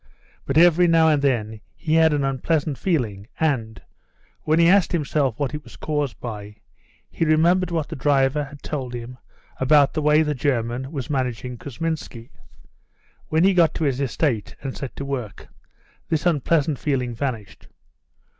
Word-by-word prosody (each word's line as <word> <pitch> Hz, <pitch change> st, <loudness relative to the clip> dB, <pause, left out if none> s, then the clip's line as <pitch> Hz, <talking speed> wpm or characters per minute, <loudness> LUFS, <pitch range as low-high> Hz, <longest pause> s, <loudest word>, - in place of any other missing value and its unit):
But 135 Hz, -, 0 dB
every 175 Hz, +1 st, +6 dB
now 165 Hz, -1 st, +5 dB
and 150 Hz, -2 st, +2 dB
then 110 Hz, -6 st, -1 dB
he 155 Hz, -, -2 dB
had 160 Hz, 0 st, +5 dB
an 145 Hz, -1 st, 0 dB
unpleasant 140 Hz, +2 st, 0 dB
feeling, 110 Hz, -, -1 dB
and, 120 Hz, -8 st, -1 dB, 0.7 s
when 155 Hz, +1 st, +2 dB
he 170 Hz, 0 st, +5 dB
asked 190 Hz, 0 st, +4 dB
himself 145 Hz, -6 st, 0 dB
what 145 Hz, -1 st, -2 dB
it 150 Hz, 0 st, -5 dB
was 120 Hz, -, -14 dB
caused 145 Hz, -5 st, -2 dB
by, 105 Hz, -3 st, -7 dB, 0.6 s
he -, -, -2 dB
remembered 170 Hz, +3 st, +3 dB
what 165 Hz, -3 st, -2 dB
the -, -, -6 dB
driver 140 Hz, +1 st, +1 dB
had 140 Hz, 0 st, -13 dB
told 130 Hz, -5 st, -4 dB
him 120 Hz, +1 st, -8 dB, 0.4 s
about 140 Hz, +1 st, +4 dB
the 155 Hz, -, -1 dB
way 150 Hz, +1 st, +4 dB
the 150 Hz, -1 st, -1 dB
German 130 Hz, -1 st, -2 dB
was 140 Hz, -4 st, -5 dB
managing 125 Hz, -3 st, -2 dB
Kousminski. 135 Hz, -2 st, -5 dB, 1.0 s
When 160 Hz, +2 st, +2 dB
he 195 Hz, +1 st, +5 dB
got 170 Hz, -3 st, +3 dB
to -, -, -2 dB
his 140 Hz, -2 st, 0 dB
estate 135 Hz, -4 st, -1 dB
and 135 Hz, -2 st, -4 dB
set 135 Hz, -, -7 dB
to 140 Hz, -, -5 dB
work 125 Hz, -7 st, -5 dB, 0.6 s
this 160 Hz, +1 st, -1 dB
unpleasant 155 Hz, -3 st, +1 dB
feeling 130 Hz, -5 st, -1 dB
vanished. 115 Hz, -5 st, -5 dB
140 Hz, 165 wpm, -22 LUFS, 125-160 Hz, 1.0 s, every